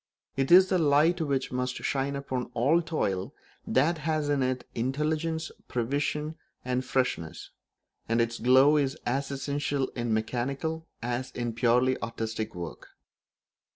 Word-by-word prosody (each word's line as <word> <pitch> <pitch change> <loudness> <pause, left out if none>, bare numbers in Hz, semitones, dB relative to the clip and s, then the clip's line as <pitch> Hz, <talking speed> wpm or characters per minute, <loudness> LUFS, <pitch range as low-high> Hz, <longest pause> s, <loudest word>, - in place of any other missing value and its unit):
It 135 0 0
is 185 +1 +8
the 185 - +2
light 160 +3 +4
which 140 -4 -1
must 125 0 -2
shine 140 0 -1
upon 130 -3 -3
all 145 +9 +3
toil 100 - -2 0.3
that 160 +5 +2
has 155 -1 -1
in 145 -2 +2
it 130 -1 -1
intelligence, 155 +6 -1 0.2
prevision, 145 +5 -1 0.3
and 125 0 0
freshness; 105 -11 -2 0.6
and 115 +1 +2
its 115 0 0
glow 130 +5 +6
is 140 -1 +1
as 135 +3 -1
essential 140 0 -1
in 120 -1 -3
mechanical 135 +9 -2 0.2
as 120 +2 -2
in 120 -1 -3
purely 125 +3 +2
artistic 110 0 -4
work. 85 -2 -7
135 Hz, 135 wpm, -28 LUFS, 120-150 Hz, 0.6 s, is